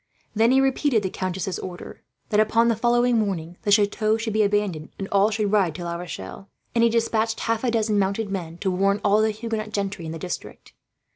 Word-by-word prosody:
Then 225 +2 +3
he 265 +1 +5
repeated 270 -4 +2
the 190 - -2
countess's 185 -1 -3
order 180 -1 -8 0.3
that, 210 - +2
upon 230 +2 +3
the 230 - +2
following 240 +1 +2
morning, 180 -5 -3
the 205 - -1
chateau 215 +1 +3
should 225 -1 -3
be 215 - +2
abandoned 200 -6 0
and 195 - -4
all 200 +1 +4
should 215 -2 -1
ride 190 -7 +2
to 175 - -6
La 170 0 -3
Rochelle; 175 - -8 0.2
and 230 - +3
he 235 - +5
despatched 225 -1 0
half 230 +1 -1
a 250 - +2
dozen 220 -2 +1
mounted 200 +2 -1
men, 170 -4 -5
to 190 - 0
warn 195 +2 +1
all 210 +1 +4
the 220 - +3
Huguenot 215 0 -4
gentry 195 -5 -3
in - - -5
the 165 - -5
district. 180 +2 -7
210 Hz, 215 wpm, -24 LUFS, 190-225 Hz, 0.3 s, he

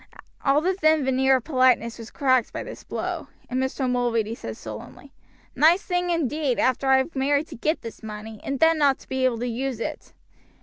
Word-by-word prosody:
All 280 +1 +3
the 370 +4 +1
thin 315 -5 +3
veneer 265 0 +3
of 255 - -1
politeness 255 -5 +2
was 225 0 -8
cracked 255 -5 +2
by - - -5
this - - -9
blow, - - -4 0.2
and 255 +1 -1
Mr. 265 0 -1
Mulready 235 -3 0
said 110 - -7
sullenly: 110 - -10 0.4
"Nice 335 +6 +5
thing 355 -1 -1
indeed; 300 -5 0
after 260 +1 +1
I 265 0 +6
have 265 +5 -1
married 285 +2 +1
to - - -8
get 305 +7 -1
this 230 - -8
money, 215 0 -8
and 275 -1 -3
then 325 0 +4
not 280 -2 +4
to - - -18
be 260 0 0
able 250 -2 +1
to 245 +2 -3
use 250 0 -3
it!" - - -6
265 Hz, 205 wpm, -24 LUFS, 235-295 Hz, 0.4 s, I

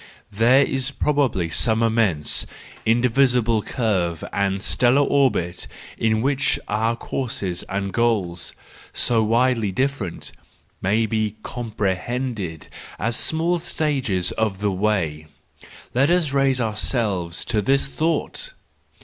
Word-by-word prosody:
There 120 +6 +5
is 135 -1 -1
probably 135 - 0
some 110 +4 +3
immense, 110 -9 +1 0.4
invisible 120 -1 +3
curve 95 -9 -1
and 100 0 0
stellar 125 +4 +3
orbit 125 -13 +1 0.3
in 110 0 +1
which 135 0 +1
our 110 +2 0
courses 110 -8 -3
and 100 0 -3
goals, 105 -8 0 0.4
so 115 -2 +2
widely 115 -1 +2
different, 130 -5 -2 0.5
may 105 +4 +2
be 110 -1 -1
comprehended 110 - -3 0.3
as 115 +3 -1
small 165 +6 +2
stages 135 - 0
of 110 -3 -1
the 105 0 0
way,—let 95 - -2
us 175 -5 +2
raise 135 -2 +2
ourselves 105 -6 -1
to 110 -3 0
this 135 +6 +2
thought! 165 - -2
115 Hz, 105 wpm, -22 LUFS, 100-130 Hz, 0.5 s, There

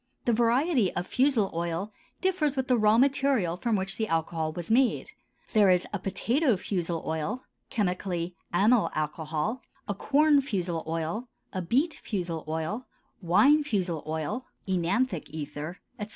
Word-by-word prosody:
The 240 - +3
variety 240 - +3
of 175 - -1
fusel 255 -3 +2
oil 170 +5 -3 0.3
differs 340 -7 +1
with 265 -1 -1
the 250 - +4
raw 215 -1 +4
material 265 -9 +2
from 230 +4 0
which 195 0 -2
the 220 - -1
alcohol 160 -1 -1
was 170 +4 -5
made; 250 +2 +2 0.4
there 210 -4 +6
is 180 -1 +3
a 205 - -1
potato 230 - +1
fusel 175 -4 -2
oil 160 +11 -2 0.3
(chemically 180 -4 -1 0.2
amyl 210 +6 +4
alcohol), 155 - -2 0.3
a 205 - 0
corn 290 +7 +4
fusel 180 - -2
oil, 165 +9 -2 0.3
a 185 - -2
beet 270 - +1
fusel 175 -6 -4
oil, 160 +10 -3 0.3
wine 270 - +5
fusel 185 - -1
oil 160 - -3 0.2
(œnanthic 185 +2 0
ether), 150 +3 -6 0.2
etc. 210 0 -4
195 Hz, 145 wpm, -28 LUFS, 170-250 Hz, 0.4 s, there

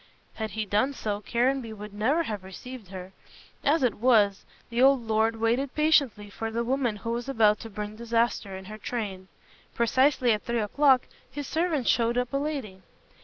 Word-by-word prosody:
Had 220 -1 -4
he 215 - -1
done 215 +8 +1
so, 210 -5 -3
Caranby 240 +1 0
would 210 -1 -9
never 260 +11 +1
have 210 - -5
received 215 +4 -9
her. 185 0 -8 0.5
As 295 +1 +3
it 245 -4 +3
was, 210 -5 +3 0.3
the 235 +1 0
old 265 -2 +5
lord 220 +1 +2
waited 235 +5 0
patiently 285 -9 +2
for 225 +2 -5
the 230 +1 -2
woman 250 -2 0
who 230 +3 -5
was 240 +2 -3
about 215 -5 +3
to 225 - -8
bring 210 0 -6
disaster 230 -4 -1
in 190 - -10
her 215 +2 -9
train. 200 -5 -4 0.5
Precisely 255 +2 +3
at 210 -1 +1
three 235 0 -2
o'clock 260 +4 +3 0.3
his 290 +2 -5
servant 320 -6 0
showed 235 0 +2
up 250 +1 -1
a - - +2
lady. 275 -10 -4
230 Hz, 180 wpm, -27 LUFS, 210-260 Hz, 0.5 s, old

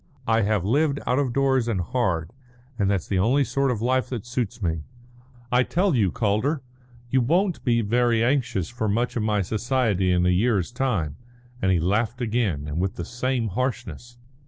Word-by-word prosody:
I 115 0 +3
have 105 -3 +1
lived 140 +5 +2
out 125 +2 +1
of 135 -4 0
doors 130 -2 +2
and 110 -5 0
hard, 90 - -1 0.5
and 100 -1 +2
that's 100 -4 0
the 95 - 0
only 125 +9 +3
sort 135 0 0
of 115 -3 -2
life 130 +1 +1
that 120 -6 -5
suits 120 -3 -3
me. 80 -5 -1 0.7
I 125 +1 +4
tell 180 +7 +1
you, 105 -7 +3
Calder, 120 +7 0 0.5
you 130 - +3
won't 175 +8 +1
be 120 -2 +2
very 115 +1 +2
anxious 120 - 0
for 120 -2 -3
much 120 +4 0
of 120 - 0
my 105 -2 +1
society 110 -3 0
in 90 0 +2
a - - +3
year's 100 +1 +1
time," 110 - -1 0.4
and 95 - +2
he 90 - +3
laughed 105 +8 0
again 110 - -1
and 75 +2 -3
with 95 +4 -1
the - - -5
same 120 -1 -1
harshness. 120 +1 -4
115 Hz, 185 wpm, -24 LUFS, 100-130 Hz, 0.7 s, I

